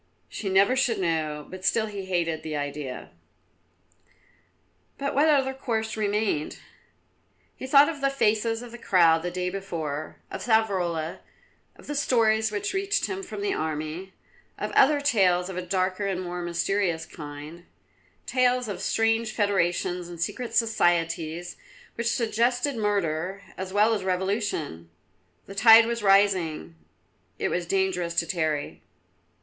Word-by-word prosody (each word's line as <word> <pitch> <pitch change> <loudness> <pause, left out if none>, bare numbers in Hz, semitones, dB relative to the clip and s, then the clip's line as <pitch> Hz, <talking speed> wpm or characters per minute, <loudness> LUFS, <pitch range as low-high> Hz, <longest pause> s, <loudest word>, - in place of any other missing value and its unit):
She 200 - -4
never 195 +6 +4
should 245 -4 +1
know, 155 -5 -1
but 185 0 -10
still 220 +3 +2
he 200 -3 -6
hated 170 -4 -1
the 155 -1 -5
idea. 145 -2 -5 1.9
But 280 0 -2
what 290 +3 +4
other 270 -3 +3
course 225 -5 -3
remained? 210 -7 -1 1.0
He 260 - -7
thought 280 +2 +7
of 300 -4 -4
the 275 - +3
faces 225 -3 +1
of 240 - -10
the 240 - -10
crowd 165 -6 +4
the 175 - -3
day 180 0 -3
before; 160 -6 -5 0.2
of - - -5
Savrola; 185 -8 0 0.6
of - - -16
the 295 - -4
stories 220 -6 +2
which 205 -1 -2
reached 395 +1 0
him 390 0 -4
from 395 +1 -7
the 405 -1 0
army; 160 +4 -4 0.4
of - - -4
other 290 +1 +4
tales 185 -9 +2
of 190 - -6
a - - -1
darker 185 +2 -1
and 190 -2 -2
more 180 -1 -5
mysterious 175 0 -1
kind, 150 +3 -10 0.6
tales 250 -1 +2
of 195 -3 -5
strange 225 +1 +1
federations 180 -4 0
and 170 -1 -9
secret 235 +8 -3
societies, 175 -6 0 0.4
which 235 0 -1
suggested 245 +3 0
murder, 195 -3 -1
as 190 0 -6
well 210 +3 +3
as 205 -3 -2
revolution. 185 - -2 0.6
The 195 - -10
tide 225 +2 +8
was 235 0 -2
rising; 190 - +2 0.6
it - - -1
was 175 -1 -2
dangerous 180 -3 0
to 170 - +2
tarry. 155 -4 -2
195 Hz, 145 wpm, -26 LUFS, 170-225 Hz, 1.9 s, tide